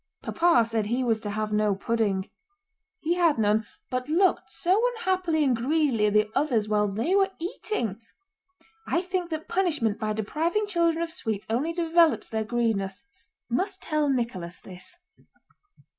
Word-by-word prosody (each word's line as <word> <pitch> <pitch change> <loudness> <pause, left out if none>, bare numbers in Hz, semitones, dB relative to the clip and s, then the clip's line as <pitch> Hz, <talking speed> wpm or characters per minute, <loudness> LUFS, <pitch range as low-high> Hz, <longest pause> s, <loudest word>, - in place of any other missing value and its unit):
Papa 335 -9 +3
said 225 -2 -1
he 245 +4 0
was 225 -3 +1
to 210 - -5
have 215 0 -2
no 210 -1 +2
pudding. 205 -2 0 0.7
He 330 +2 +1
had 340 -5 +3
none, 215 0 +2 0.2
but 255 +2 -2
looked 365 +4 +2
so 375 +5 +1
unhappily 370 -8 0
and 260 -4 +3
greedily 255 -3 +1
at 205 - 0
the 210 0 +3
others 250 -7 +1
while 210 -1 +2
they 225 - -1
were 390 -1 +4
eating! 245 - -3 0.9
I 340 - +1
think 365 -1 -2
that 315 -1 -4
punishment 300 - 0
by 215 -1 -1
depriving 320 - -1
children 335 -4 +1
of 335 - -5
sweets 220 -9 -3
only 275 +9 0
develops 335 -1 +2
their 220 -1 -1
greediness. 220 -2 -1 0.4
Must 375 - -1
tell 305 -2 0
Nicholas 230 -10 -2
this. 185 - -10
255 Hz, 155 wpm, -26 LUFS, 215-335 Hz, 0.9 s, were